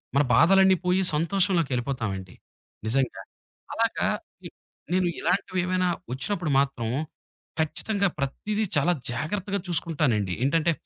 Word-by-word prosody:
మన 145 - +5
బాధలన్నీ 190 +7 +6
పోయి 180 +1 +3 0.2
సంతోషంలోకెళ్ళిపోతామండి 135 - 0 0.5
నిజంగా. 130 +3 0 0.5
అలాగా - - 0 0.4
ఇ - - -6 0.4
నేను 185 -1 +2
ఇలాంటివేమైనా 185 -1 0 0.2
ఒచ్చినప్పుడు 170 +4 -2
మాత్రం 135 -5 -1 0.7
ఖచ్చితంగా 200 +6 +1
ప్రతిదీ 205 +10 -2
చాలా 160 +5 +3 0.2
జాగ్రత్తగా 195 +8 -2
చూసుకుంటానండి. 145 - 0
ఏంటంటే 165 +3 +2
165 Hz, 95 wpm, -26 LUFS, 135-185 Hz, 0.7 s, బాధలన్నీ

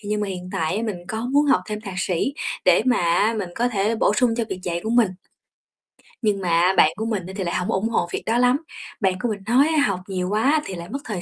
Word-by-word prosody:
thì 205 - -9
nhưng 210 0 0
mà 205 - -2
hiện 180 -1 -6
tại 160 +4 -1
á 225 - -2
mình 215 -5 -2
có 220 +3 -3
muốn 290 +1 +4
học 275 - +4
thêm 210 -1 -4
thạc 200 -4 -7
sĩ 185 +9 -1 0.3
để - - +5
mà 250 -1 +4
á 175 +6 +2
mình 185 -4 -4
có 240 +1 +1
thể 215 -1 0
bổ 210 - +2
sung 240 0 +2
cho 235 - 0
việc 190 -2 -5
dạy 175 -2 -2
của 220 - -2
mình. 235 -3 +4 1.1
Nhưng 205 -3 +1
mà 175 +1 +3
bạn 155 - +6
của 220 - -4
mình 210 -6 -2
á 190 - -8
thì 190 - -2
lại 175 - -2
hông 180 - -1
ủng 205 +4 0
hộ 230 - 0
việc - - -3
đó 225 +2 +1
lắm. 250 +2 +4 0.4
Bạn 190 -2 +3
của 240 - -1
mình 210 -2 -3
nói 255 +6 +4
á 300 - +4
học 195 -3 -1
nhiều 185 -1 -2
quá 265 +9 +2
thì 190 - -5
lại 170 0 -8
mất 275 - -4
thời 205 -6 -4
210 Hz, 280 wpm, -22 LUFS, 185-230 Hz, 1.1 s, bạn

